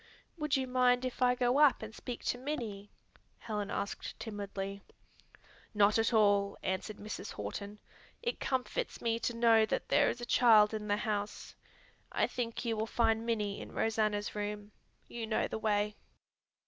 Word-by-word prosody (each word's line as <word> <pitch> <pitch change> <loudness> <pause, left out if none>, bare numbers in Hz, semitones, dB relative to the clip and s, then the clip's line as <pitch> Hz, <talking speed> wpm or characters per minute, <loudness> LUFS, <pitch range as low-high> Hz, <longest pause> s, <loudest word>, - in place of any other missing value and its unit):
"Would 300 -4 0
you 265 - -1
mind 250 0 +3
if 255 0 -5
I 250 0 +4
go 250 +2 +2
up 295 -6 +5
and 220 0 -7
speak 245 +1 -7
to 245 - -1
Minnie?" 230 -8 -4 0.5
Helen 210 -2 -4
asked 200 0 -4
timidly. 200 -2 -5 0.9
"Not 210 +1 +4
at 225 - +2
all," 205 -3 +3
answered 190 +3 -2
Mrs. 215 +1 -6
Horton. 200 - -6 0.5
"It 475 0 -2
comforts 260 -2 -2
me 230 -1 0
to 235 - -2
know 230 -1 +5
that - - -2
there 290 0 +4
is - - -3
a 240 - -5
child 225 -3 +6
in 210 -1 -4
the 205 0 +2
house. 210 -1 -3 0.6
I - - +2
think 240 0 -4
you 230 -1 0
will 220 +1 -1
find 225 0 +1
Minnie 210 -3 -1
in - - -9
Rosanna's 215 -2 0
room. 210 0 -4 0.4
You 230 -2 -5
know 220 - +1
the - - -4
way." 210 -1 0
220 Hz, 165 wpm, -32 LUFS, 205-245 Hz, 0.9 s, child